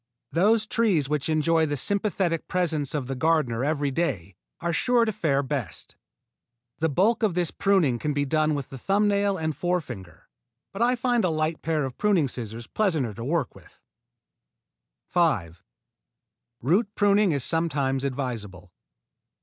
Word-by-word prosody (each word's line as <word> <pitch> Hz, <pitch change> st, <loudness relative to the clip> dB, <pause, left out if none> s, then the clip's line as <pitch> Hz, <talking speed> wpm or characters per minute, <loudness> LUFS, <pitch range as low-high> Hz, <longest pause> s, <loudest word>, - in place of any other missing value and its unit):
Those 210 Hz, +6 st, +3 dB
trees 205 Hz, -10 st, +1 dB
which 150 Hz, +1 st, -1 dB
enjoy 160 Hz, +1 st, +2 dB
the 145 Hz, -1 st, -2 dB
sympathetic 190 Hz, -1 st, 0 dB
presence 160 Hz, -6 st, -1 dB
of 140 Hz, -4 st, -2 dB
the 135 Hz, -, -4 dB
gardener 130 Hz, -4 st, +1 dB
every 145 Hz, -1 st, 0 dB
day 105 Hz, -, -2 dB, 0.3 s
are 170 Hz, 0 st, -2 dB
sure 240 Hz, +6 st, +3 dB
to 220 Hz, -, 0 dB
fare 140 Hz, -8 st, 0 dB
best. 135 Hz, -4 st, -5 dB, 0.8 s
The 160 Hz, 0 st, +1 dB
bulk 195 Hz, -, +2 dB
of 210 Hz, -6 st, +1 dB
this 175 Hz, -2 st, 0 dB
pruning 175 Hz, -12 st, +2 dB
can 150 Hz, -, -1 dB
be 145 Hz, 0 st, 0 dB
done 155 Hz, +1 st, +1 dB
with 140 Hz, -3 st, -5 dB
the 135 Hz, -, -9 dB
thumb 200 Hz, -, +2 dB
nail 200 Hz, -1 st, +1 dB
and 160 Hz, -2 st, -2 dB
forefinger, 125 Hz, -, -4 dB, 0.5 s
but 195 Hz, -, -5 dB
I 245 Hz, +1 st, +3 dB
find 245 Hz, -2 st, +1 dB
a 180 Hz, -, +2 dB
light 155 Hz, 0 st, -1 dB
pair 155 Hz, -3 st, 0 dB
of 130 Hz, -2 st, -8 dB
pruning 195 Hz, -8 st, +3 dB
scissors 115 Hz, -1 st, -7 dB
pleasanter 160 Hz, -, 0 dB
to 115 Hz, -, -7 dB
work 145 Hz, -2 st, -1 dB
with. -, -, -19 dB, 1.2 s
5. 100 Hz, -, 0 dB, 1.0 s
Root 200 Hz, -, +1 dB
pruning 205 Hz, -1 st, +3 dB
is 140 Hz, -4 st, -1 dB
sometimes 140 Hz, -5 st, 0 dB
advisable. 115 Hz, -10 st, -4 dB
155 Hz, 155 wpm, -25 LUFS, 135-190 Hz, 1.2 s, Those